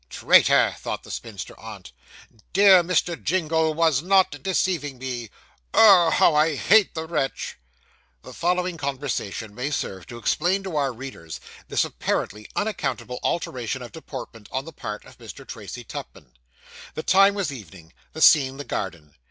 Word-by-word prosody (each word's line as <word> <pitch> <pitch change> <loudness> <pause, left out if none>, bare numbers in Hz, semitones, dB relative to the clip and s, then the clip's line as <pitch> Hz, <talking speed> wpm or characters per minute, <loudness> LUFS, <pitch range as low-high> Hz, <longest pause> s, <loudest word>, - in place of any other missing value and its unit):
'Traitor!' - - +4
thought - - -5
the - - -11
spinster 100 -8 -7
aunt. - - -10 0.6
'Dear 195 -1 +7
Mr. 175 -1 0
Jingle 160 -2 0
was 160 -4 +2
not 190 +2 +3
deceiving 175 -7 -1
me. 125 -3 -5 0.5
Ugh! 185 -7 +7
how - - +4
I 155 +1 +3
hate 205 +8 +4
the 160 0 -3
wretch!' 150 - -3 0.6
The - - -11
following 180 0 -1
conversation 130 -7 -4
may 125 +6 -3
serve 95 - -4
to 120 - -9
explain 180 +10 0
to 190 -4 -5
our 140 -3 +1
readers 115 - -9 0.3
this - - +1
apparently 105 +1 -3
unaccountable 205 -11 -3
alteration 130 -6 -2
of 120 - -10
deportment 130 -8 -9
on 135 +1 -3
the 165 - -10
part 105 0 -7
of - - -17
Mr. - - -11
Tracy - - -8
Tupman. - - -9 0.6
The 155 - -4
time 195 +1 +5
was 195 -7 -2
evening; 90 - -12 0.2
the 160 - -7
scene 135 -4 +6
the 145 - -6
garden. 85 - -5
150 Hz, 150 wpm, -24 LUFS, 120-175 Hz, 0.6 s, Dear